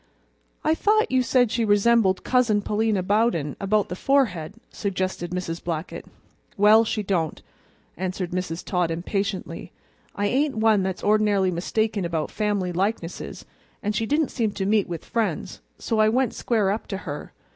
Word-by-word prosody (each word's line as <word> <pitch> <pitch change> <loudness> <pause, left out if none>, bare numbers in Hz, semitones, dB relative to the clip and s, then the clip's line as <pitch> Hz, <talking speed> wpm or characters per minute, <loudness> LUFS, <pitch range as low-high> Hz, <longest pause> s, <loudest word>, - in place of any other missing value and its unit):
"I 310 - +3
thought 430 +6 +2
you 260 0 +3
said 245 -2 +2
she 230 0 0
resembled 205 -2 +3
Cousin 230 -5 +2
Pa'lina 210 -2 0
Bowden 200 - +1
about 205 +1 +1
the 180 - -5
forehead," 200 - +1 0.2
suggested 185 -3 -3
Mrs. 175 -2 -4
Blackett. 165 0 -4 0.5
"Well, 210 +2 +6
she 215 -1 -2
don't," 175 -5 -1 0.6
answered 185 0 -3
Mrs. 180 -2 -3
Todd 180 -3 0
impatiently. 190 +4 -3 0.4
"I 205 - -1
ain't 270 +6 +1
one 220 -2 +4
that's 190 -1 -3
ord'narily 205 -3 +3
mistaken 205 +4 -1
about 165 -2 -2
family 205 -4 -1
likenesses, 185 -1 -3 0.4
and 210 0 -1
she 225 +1 0
didn't 300 +2 +1
seem 220 -4 -1
to 195 - -3
meet 205 -1 +2
with 170 -2 -5
friends, 230 -2 -2 0.2
so 225 -2 -1
I 215 0 +5
went 250 +1 +1
square 215 -5 +1
up 215 - -3
to 195 - -3
her. 145 -3 -6
205 Hz, 155 wpm, -24 LUFS, 180-225 Hz, 0.6 s, Well